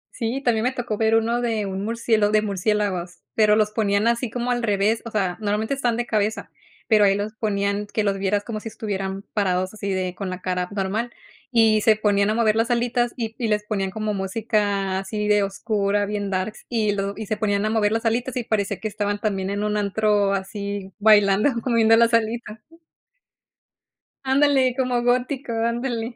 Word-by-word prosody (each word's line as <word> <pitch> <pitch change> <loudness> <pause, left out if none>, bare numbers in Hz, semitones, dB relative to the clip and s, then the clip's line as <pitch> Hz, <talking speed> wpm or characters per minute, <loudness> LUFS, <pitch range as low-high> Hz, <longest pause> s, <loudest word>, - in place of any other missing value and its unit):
Sí, 245 +3 -3
también 225 -3 +2
me 250 - +1
tocó 240 -4 -3
ver 220 +1 +2
1 230 +2 +1
de 225 -3 -1
un 195 0 -4
murcielo 225 -2 +1
de 215 0 +2
murciélagos, 195 -3 -2
pero 210 -1 +4
los 215 -1 +2
ponían 210 -1 +1
así 235 +1 0
como 245 +2 -2
al 240 0 0
revés, 215 0 +1
o - - -5
sea, 190 -5 -1
normalmente 210 +4 -1
están 245 -4 0
de 240 - -1
cabeza 215 -1 -1 0.4
pero 215 -2 +5
ahí 195 0 +4
los 205 +1 -3
ponían, 205 -1 -1
que 215 +1 -1
los 200 -1 0
vieras 200 +1 0
como 215 -1 -5
si 220 - -8
estuvieran 195 -3 -4
parados 185 -2 0
así 200 -2 -4
de 185 -1 -2
con 195 +1 -5
la 185 0 -6
cara 180 -1 -2
normal, 210 +5 -2 0.4
y 225 -3 +4
se 220 +1 +5
ponían 205 -1 +2
a 215 - +1
mover 220 -2 +2
las 225 +2 +1
alitas 240 0 0
y 225 -2 -3
y 235 - 0
les 210 -1 0
ponían 195 -3 -2
como 215 +1 -3
música 200 -1 -1
así 210 +2 -3
de 210 0 +4
oscura, 205 0 0
bien 205 -1 -3
darks, 190 +2 -3
y 220 -3 +1
lo 200 0 -2
y 220 - -5
se 215 +1 -2
ponían 205 -1 0
a - - +1
mover 215 -2 +2
las 225 +1 -2
alitas 240 +3 0
y 250 - -1
parecía 210 -3 -1
que 215 - -3
estaban, 205 0 -2
también, 195 -3 -2
en 200 +1 -2
un 210 0 0
antro 205 0 +1
así 200 0 -4
bailando, 205 +2 +5
co - - -2
moviendo 225 -1 +5
las 235 0 +4
alitas. 225 -1 -1 1.7
Ándale, 265 -1 +3
como 250 -2 +1
gótico, 250 +2 0
ándale. 235 +1 -2
215 Hz, 195 wpm, -23 LUFS, 200-230 Hz, 1.7 s, pero